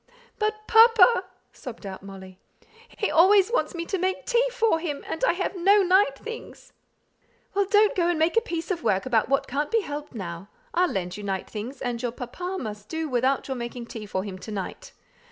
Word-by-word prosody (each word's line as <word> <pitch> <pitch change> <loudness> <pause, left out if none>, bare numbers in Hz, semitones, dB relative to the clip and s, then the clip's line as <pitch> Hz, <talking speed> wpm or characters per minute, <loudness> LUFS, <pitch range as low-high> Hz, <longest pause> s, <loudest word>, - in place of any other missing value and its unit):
"But 430 0 -1
papa!" 450 -3 +6 0.3
sobbed 235 -4 -9
out 190 -1 -7
Molly. 190 -1 -11 0.6
"He 415 - 0
always 385 +5 +5
wants 480 - 0
me 335 0 -3
to 385 +2 -2
make 375 +1 -1
tea 480 0 +3
for 455 -9 +2
him; 300 -4 -4
and 320 - -5
I - - +4
have 370 +2 -3
no 395 +3 +4
night 365 -6 +3
things." 460 +7 -9 0.8
"Well, 400 -1 +1
don't 420 +1 +4
go 345 -2 +2
and 350 -2 +1
make 320 +5 +2
a 460 - +5
piece 340 -5 -4
of 345 -2 -2
work 195 -4 +1
about 235 -3 +1
what 275 - +2
can't 285 +3 -2
be 455 -1 +2
helped 290 -6 -7
now. 185 -1 -6 0.2
I'll 360 0 +3
lend 180 -1 -3
you 210 - -8
night 195 -2 -3
things, 240 +6 -7
and 240 -2 -2
your 245 -2 -2
papa 355 +11 -5
must 210 -2 -7
do 320 0 -3
without 260 +1 +1
your 265 -2 -3
making 240 0 -6
tea 220 -2 -8
for 190 -1 -2
him 190 -2 -7
to 220 - -10
night. 210 - -6
300 Hz, 210 wpm, -25 LUFS, -, 0.8 s, papa